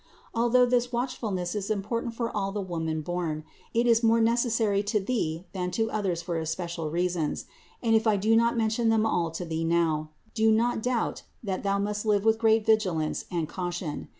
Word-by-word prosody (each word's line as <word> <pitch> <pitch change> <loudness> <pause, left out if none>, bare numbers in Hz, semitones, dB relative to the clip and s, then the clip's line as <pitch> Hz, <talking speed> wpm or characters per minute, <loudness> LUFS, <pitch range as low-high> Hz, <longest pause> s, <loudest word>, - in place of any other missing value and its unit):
Although 240 +2 +4
this 245 0 +1
watchfulness 220 -8 -2
is 205 -1 -3
important 225 +3 -2
for 230 0 -3
all 195 -1 -1
the 205 - -3
woman 165 -4 -2
born, 160 -2 -3 0.3
it 235 +1 +2
is 230 -1 +4
more 230 0 +4
necessary 225 -3 +2
to 210 +1 0
thee 185 -6 -2
than 180 -2 -2
to 225 0 0
others 190 -5 -1
for 170 -1 -2
especial 165 0 -3
reasons: 175 -1 -1 0.4
and 225 -1 +3
if 220 +1 +2
I 210 -2 +4
do 215 +3 +3
not 235 +1 +3
mention 225 +1 +1
them 220 -1 +3
all 175 -6 +1
,to 165 +2 -5
thee 165 0 -2
now, 165 -2 +1 0.2
do 220 -1 +3
not 230 +1 +2
doubt, 245 0 -1 0.2
that 190 -3 -2
thou 200 0 +1
must 205 +1 -2
live 205 -1 +2
with 220 0 +4
great 220 -1 +3
vigilance 185 -9 +1
and 170 -4 -2
caution. 175 -3 -4
205 Hz, 190 wpm, -27 LUFS, 175-225 Hz, 0.4 s, Although